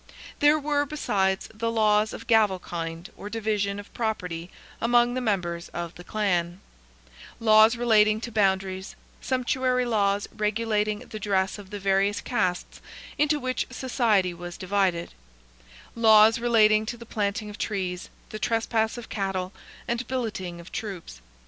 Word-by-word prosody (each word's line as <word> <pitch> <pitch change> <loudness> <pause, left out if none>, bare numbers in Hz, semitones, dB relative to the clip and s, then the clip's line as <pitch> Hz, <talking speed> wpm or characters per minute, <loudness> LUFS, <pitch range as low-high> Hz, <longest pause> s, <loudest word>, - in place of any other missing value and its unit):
There 295 +1 +5
were, 290 -1 0
besides, 195 -10 0
the 230 +1 -2
laws 215 -1 +3
of - - -8
gavelkind 180 -6 0
or 205 - -8
division 210 -2 -1
of 205 - -12
property 180 -7 -3 0.3
among 240 +1 +3
the 255 - -2
members 180 -7 -2
of 170 -1 -4
the 175 - -12
clan; 180 -4 -1 0.8
laws 220 0 +6
relating 215 -3 +4
to 235 - -5
boundaries; 190 -2 0 0.3
sumptuary 255 -1 0
laws 205 -3 +1
regulating 215 0 0
the 215 - -7
dress 195 0 0
of 195 -2 -12
the 205 - -5
various 195 +2 +1
castes 210 -9 -2 0.4
into 295 0 +2
which 255 -1 -2
society 235 -8 +1
was 175 0 -8
divided; 185 -3 0 0.8
laws 220 0 +6
relating 220 -2 +4
to 235 - -4
the 235 - -11
planting 210 -1 -2
of 205 - -11
trees, 185 -4 -3 0.2
the 215 - -6
trespass 225 0 0
of 240 - -8
cattle, 190 -2 -3 0.3
and 235 +1 -2
billeting 205 -9 -4
of 170 - -12
troops. 190 - -6
210 Hz, 140 wpm, -26 LUFS, 190-230 Hz, 0.8 s, laws